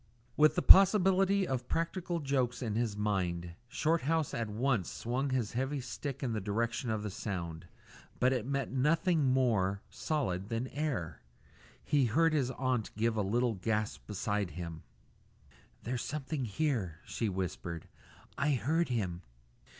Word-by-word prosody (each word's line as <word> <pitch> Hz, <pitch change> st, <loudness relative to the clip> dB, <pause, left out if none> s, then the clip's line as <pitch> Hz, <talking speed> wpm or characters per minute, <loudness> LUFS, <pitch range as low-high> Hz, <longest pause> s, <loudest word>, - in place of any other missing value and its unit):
With 155 Hz, 0 st, +5 dB
the 180 Hz, -, 0 dB
possibility 195 Hz, 0 st, +6 dB
of 130 Hz, -2 st, -2 dB
practical 170 Hz, +1 st, -1 dB
jokes 130 Hz, -4 st, 0 dB
in 110 Hz, -3 st, -2 dB
his 110 Hz, -2 st, -1 dB
mind, 90 Hz, -5 st, -1 dB
Shorthouse 160 Hz, +2 st, 0 dB
at 115 Hz, -2 st, -2 dB
once 115 Hz, -2 st, 0 dB
swung 130 Hz, +4 st, -2 dB
his 125 Hz, -5 st, -1 dB
heavy 135 Hz, +4 st, -1 dB
stick 135 Hz, +2 st, -5 dB
in 120 Hz, -3 st, -1 dB
the 110 Hz, -, -2 dB
direction 115 Hz, +4 st, -1 dB
of 110 Hz, -1 st, -1 dB
the 105 Hz, -, -3 dB
sound; 85 Hz, -5 st, -5 dB, 0.5 s
but 130 Hz, +1 st, +4 dB
it 120 Hz, -2 st, -2 dB
met 140 Hz, -1 st, -1 dB
nothing 155 Hz, +4 st, +2 dB
more 110 Hz, -7 st, +2 dB
solid 100 Hz, -, -2 dB
than 115 Hz, +2 st, -2 dB
air. 125 Hz, -, -3 dB, 0.6 s
He 145 Hz, -3 st, +2 dB
heard 160 Hz, +8 st, +3 dB
his 135 Hz, -5 st, +1 dB
aunt 130 Hz, -3 st, -1 dB
give 115 Hz, +1 st, +1 dB
a 110 Hz, -, +1 dB
little 115 Hz, +4 st, +1 dB
gasp 105 Hz, +2 st, -2 dB
beside 105 Hz, -1 st, -1 dB
him. 85 Hz, 0 st, -7 dB, 1.0 s
"There's 120 Hz, +1 st, -2 dB
someone 145 Hz, -2 st, -3 dB
here," 105 Hz, -, -1 dB
she 115 Hz, -, -2 dB
whispered; 85 Hz, -4 st, -4 dB, 0.5 s
"I 145 Hz, +1 st, +2 dB
heard 155 Hz, +6 st, +1 dB
him." 95 Hz, -8 st, -2 dB
120 Hz, 145 wpm, -32 LUFS, 105-145 Hz, 1.0 s, possibility